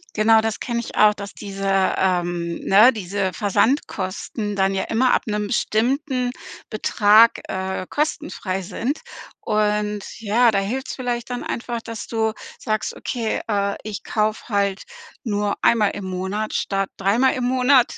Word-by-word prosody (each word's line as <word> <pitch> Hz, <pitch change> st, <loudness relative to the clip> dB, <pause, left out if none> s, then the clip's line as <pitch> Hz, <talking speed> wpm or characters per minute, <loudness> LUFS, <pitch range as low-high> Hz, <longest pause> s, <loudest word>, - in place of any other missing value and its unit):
Genau 220 Hz, +1 st, +5 dB
das 220 Hz, -1 st, -2 dB
kenne 235 Hz, -1 st, -2 dB
ich 235 Hz, -, -8 dB
auch, 210 Hz, 0 st, +6 dB
dass 200 Hz, 0 st, -8 dB
diese 195 Hz, -1 st, -5 dB, 0.3 s
ähm, 175 Hz, -2 st, 0 dB
ne, 215 Hz, +6 st, +7 dB
diese 195 Hz, -3 st, -2 dB
Versandkosten 205 Hz, -, -1 dB
dann 195 Hz, 0 st, +2 dB
ja 190 Hz, -, 0 dB
immer 245 Hz, +3 st, +2 dB
ab -, -, +1 dB
'nem 210 Hz, -1 st, -1 dB
bestimmten 250 Hz, +4 st, 0 dB, 0.4 s
Betrag, 215 Hz, +1 st, +4 dB
äh, 190 Hz, -1 st, -3 dB
kostenfrei 290 Hz, -10 st, -2 dB
sind. 250 Hz, -, -3 dB, 0.4 s
Und 210 Hz, 0 st, 0 dB, 0.2 s
ja, 230 Hz, +3 st, +4 dB
da 200 Hz, -, +1 dB
hilft's 245 Hz, +7 st, -3 dB
vielleicht 245 Hz, -2 st, -3 dB
dann 245 Hz, 0 st, -4 dB
einfach, 235 Hz, 0 st, -3 dB
dass 230 Hz, -1 st, -7 dB
du 220 Hz, -1 st, 0 dB, 0.3 s
sagst: 215 Hz, -1 st, -2 dB
„Okay, 230 Hz, -3 st, -2 dB
äh, 200 Hz, -2 st, 0 dB
ich 215 Hz, -2 st, -5 dB
kaufe 215 Hz, +1 st, -1 dB
halt 200 Hz, -2 st, 0 dB, 0.4 s
nur 205 Hz, -4 st, -1 dB
einmal 215 Hz, -3 st, +4 dB
im 200 Hz, -2 st, -6 dB
Monat 190 Hz, +4 st, -3 dB
statt 195 Hz, -1 st, -1 dB
dreimal 220 Hz, +7 st, +2 dB
im 250 Hz, -, -2 dB
Monat, 255 Hz, 0 st, +3 dB
215 Hz, 145 wpm, -22 LUFS, 195-235 Hz, 0.4 s, ne